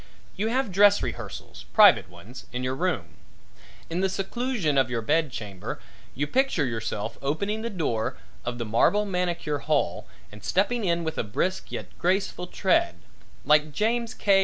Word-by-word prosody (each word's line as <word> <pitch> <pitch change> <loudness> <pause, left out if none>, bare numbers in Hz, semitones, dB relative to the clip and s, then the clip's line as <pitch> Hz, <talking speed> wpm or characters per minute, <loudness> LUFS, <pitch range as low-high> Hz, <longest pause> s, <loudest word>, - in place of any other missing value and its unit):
You 210 - -1
have 250 -2 0
dress 205 +2 +5
rehearsals - - -6
private - - +7
ones 125 +5 -12
in 125 +1 -3
your 130 0 -1
room. 135 - -2 0.7
In 165 +2 -3
the 190 0 +2
seclusion 195 - -1
of 135 -2 +3
your 115 -2 -2
bed 155 +3 +2
chamber 100 -6 -6 0.4
you 145 - 0
picture 255 - +1
yourself 110 -2 -3
opening 200 +10 -1
the 230 - -3
door 145 - -2 0.3
of 120 0 -3
the 120 - -3
marble 120 - +3
manicure 175 -6 -1
hall 145 - 0 0.2
and 105 0 -13
stepping 210 +4 +1
in 170 -1 +1
with 160 -1 -3
a - - +1
brisk 135 - -2
yet - - -6
graceful 180 0 0
tread 175 - +2 0.5
like 150 +1 +4
James 230 +3 0
K. 195 -2 +4
165 Hz, 160 wpm, -26 LUFS, 125-200 Hz, 0.7 s, private